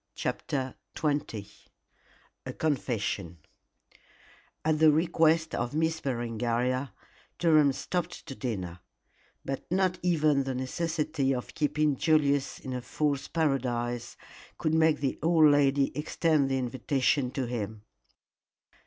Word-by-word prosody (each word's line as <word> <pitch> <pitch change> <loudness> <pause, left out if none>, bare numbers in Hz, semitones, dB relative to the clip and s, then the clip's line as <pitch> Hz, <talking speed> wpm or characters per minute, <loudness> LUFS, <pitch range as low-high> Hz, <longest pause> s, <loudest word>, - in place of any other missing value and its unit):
CHAPTER 130 -2 -2 0.2
XX 145 -9 -2 1.0
A - - -4
CONFESSION 110 - -2 1.3
At 155 -1 +2
the 160 0 +7
request 160 0 +2
of 120 +4 -2
Miss 160 +1 0
Berengaria, 120 +1 -1 0.5
Durham 155 -4 +5
stopped 175 +5 -4
to 140 - -7
dinner; 95 -10 -4 0.7
but 135 - -3
not 185 -1 +1
even 155 -5 +2
the 135 -1 -3
necessity 150 0 -1
of 125 - -6
keeping 150 -1 +1
Julius 145 -3 +2
in 130 - -6
a 125 - -3
fool's 140 +2 -1
paradise 120 -6 -1 0.4
could 155 - 0
make 160 -2 +3
the 135 - -1
old 160 0 +5
lady 140 -1 +3
extend 150 -1 +1
the 135 - +1
invitation 130 +1 0
to 135 - -1
him. 110 -3 -4
140 Hz, 115 wpm, -29 LUFS, 125-155 Hz, 1.3 s, the